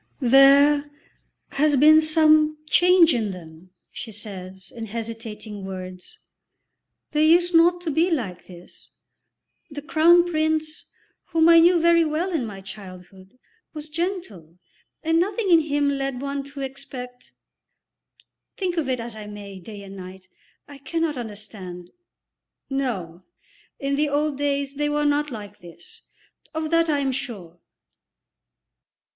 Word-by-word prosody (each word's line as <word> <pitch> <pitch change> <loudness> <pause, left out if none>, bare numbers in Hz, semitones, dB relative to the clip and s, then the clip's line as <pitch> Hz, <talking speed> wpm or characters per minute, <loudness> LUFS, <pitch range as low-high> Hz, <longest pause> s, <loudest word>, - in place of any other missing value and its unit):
"There 280 +3 +5 0.6
has 295 +1 +2
been 310 +3 +6
some 310 -1 +4
change 355 -2 +5
in 225 -4 -1
them," 170 -1 -11 0.2
she 225 - -8
says, 190 -3 -9
in 225 -1 -6
hesitating 225 -2 -7
words. 185 -1 -9 0.9
"They 305 +1 +3
used 345 +2 +4
not 345 +2 +4
to 335 -3 -3
be 330 +5 +2
like 220 - -3
this. 175 -1 -14 0.8
The 290 -1 -8
Crown 335 +2 +4
Prince, 315 -2 -2 0.4
whom 325 0 +2
I 335 0 +8
knew 345 +1 +5
very 335 0 +4
well 320 +4 -2
in 285 -9 -2
my 195 -2 -9
childhood, 190 +1 -12 0.4
was 305 0 -8
gentle, 315 - -5 0.5
and 325 +1 +2
nothing 390 +2 -1
in 335 - +7
him 290 -2 0
led 275 -2 -2
one 280 +1 -3
to 280 0 -9
expect 260 -2 -8 1.2
Think 360 -3 -2
of 300 -5 -1
it 255 -1 -1
as 230 -1 -7
I 210 -1 -9
may, 200 -2 -9
day 200 +2 -10
and 195 0 -11
night, 190 0 -11 0.4
I 285 -1 -13
cannot 325 +2 -2
understand 205 -6 -8 0.8
No, 190 -11 -3 0.5
in 275 0 -2
the 300 0 +1
old 295 +1 0
days 280 -1 -1
they 295 +1 -1
were 295 0 0
not 295 +1 +1
like 210 -4 -9
this, 170 -1 -14 0.5
of 315 0 -3
that 330 0 +3
I 295 - +2
am 270 -1 0
sure." 200 -10 -6
275 Hz, 140 wpm, -23 LUFS, 205-315 Hz, 1.2 s, I